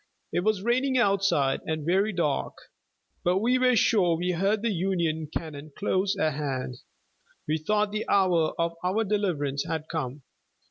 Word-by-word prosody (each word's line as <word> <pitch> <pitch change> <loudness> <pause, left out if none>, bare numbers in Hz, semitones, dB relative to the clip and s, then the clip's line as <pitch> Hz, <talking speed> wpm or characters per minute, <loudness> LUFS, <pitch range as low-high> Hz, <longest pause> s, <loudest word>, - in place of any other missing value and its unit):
It - - +2
was 200 +1 0
raining 255 +3 +1
outside, 195 - +2
and 155 -2 -2
very 195 +5 +2
dark, 70 - -1 0.7
but 180 +1 +2
we 245 +5 +2
were 255 -1 +4
sure 185 -7 +3
we 180 +2 -1
heard 200 +5 0
the 230 - +1
Union 170 -4 -1
cannon 155 -2 -6
close 195 0 0
at 155 -3 +1
hand. 135 -4 -3 0.7
We 155 +1 0
thought 210 +5 +1
the 215 +1 -3
hour 180 -5 +3
of 170 0 0
our 190 +5 +1
deliverance 175 -10 -1
had 160 -2 -3
come. 145 -4 -4
180 Hz, 155 wpm, -27 LUFS, 155-205 Hz, 0.7 s, were